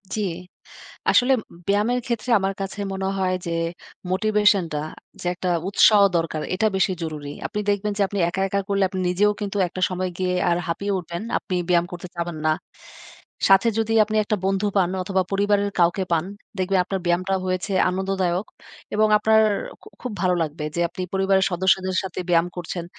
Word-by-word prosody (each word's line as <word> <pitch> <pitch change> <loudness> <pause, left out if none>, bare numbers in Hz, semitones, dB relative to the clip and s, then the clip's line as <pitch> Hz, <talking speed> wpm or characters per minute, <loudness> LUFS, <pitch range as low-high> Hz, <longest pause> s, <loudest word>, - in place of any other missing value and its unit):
জি। 215 - -1 0.9
আসলে 250 +2 +4 0.2
উম - - -14
ব্যায়ামের 210 +5 +2
ক্ষেত্রে 235 -1 -3
আমার 195 0 -1
কাছে 195 +1 -5
মনে 190 0 -2
হয় 185 -1 +1
যে, 170 - -3 0.6
"মোটিভেশনটা 205 -5 +2 0.4
যে - - -9
একটা 180 +1 -3 0.2
উৎসাহ 205 +1 +6
দরকার, 165 -2 -1
এটা 220 +3 +2
বেশি 190 0 +2
জরুরি।" 150 -3 -5 0.2
আপনি 210 - -4
দেখবেন 205 +1 0
যে - - 0
আপনি 200 +1 -4
একা, 190 +2 -3
একা 200 +1 0
করলে 200 -1 +1
আপনি 190 - -4
নিজেও 205 +4 +3
কিন্তু 205 0 -3
একটা 185 +2 -7
সময় 185 0 -2
গিয়ে 185 -1 0 0.2
আর 170 - +2
হাঁপিয়ে 200 +4 -2
উঠবেন। 170 0 -6 0.2
আপনি 185 - -4
ব্যায়াম 175 -1 +4
করতে 175 0 -7
চাবেন 170 -1 -3
না। 155 - +4 1.0
সাথে 195 +4 +6
যদি 225 0 0
আপনি 215 +1 -4
একটা 215 - 0
বন্ধু 195 +1 +1
পান 180 -3 +3
অথবা, 190 0 +1
পরিবারের 200 0 +1
কাউকে 175 +3 +3
পান, 165 0 +2 0.3
দেখবেন 190 0 +1
আপনার 195 +1 -2
ব্যায়ামটা 180 +2 +1
হয়েছে 185 +2 -2 0.2
আনন্দদায়ক 190 0 -1 0.5
এবং 215 +1 +4
আপনার 220 +1 +4 0.4
খু - - -15
খুব 250 - -4
ভালো 180 -1 +2
লাগবে 150 0 -5
যে 170 - 0
আপনি 180 - -7
পরিবারের 190 0 +3
সদস্যদের 185 +1 +1
সাথে 190 -1 -5
ব্যায়াম 170 0 +4
করছেন। 175 0 -4
190 Hz, 175 wpm, -23 LUFS, 175-205 Hz, 1.0 s, উৎসাহ